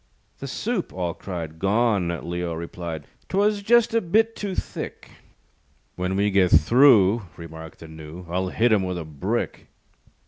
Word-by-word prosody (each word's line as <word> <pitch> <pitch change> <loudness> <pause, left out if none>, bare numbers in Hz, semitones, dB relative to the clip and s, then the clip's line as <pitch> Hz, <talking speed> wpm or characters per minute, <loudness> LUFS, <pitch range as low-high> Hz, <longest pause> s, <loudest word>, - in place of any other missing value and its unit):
"The - - -6
soup," - - -2
all 90 -2 -3
cried. 80 -4 -7
"Gone," 100 -1 +2 0.2
Leo 85 -1 -3
replied, 85 -2 -6 0.2
"'Twas 205 +1 +2
just 235 +2 +4
a 230 - +3
bit 220 +6 +2
too 200 -3 -4
thick." - - -6 0.8
"When 90 +1 -2
we 100 +1 +2
get 95 -2 +4
through," 115 -5 +5
Remarked 80 -1 -10
the 80 - -9
Gnu, 80 +3 -10
"I'll 90 +2 -1
hit 115 +5 +2
him 105 - +3
with 90 -1 -3
a 85 - -5
brick." 75 -3 -3
95 Hz, 150 wpm, -24 LUFS, 85-120 Hz, 0.8 s, through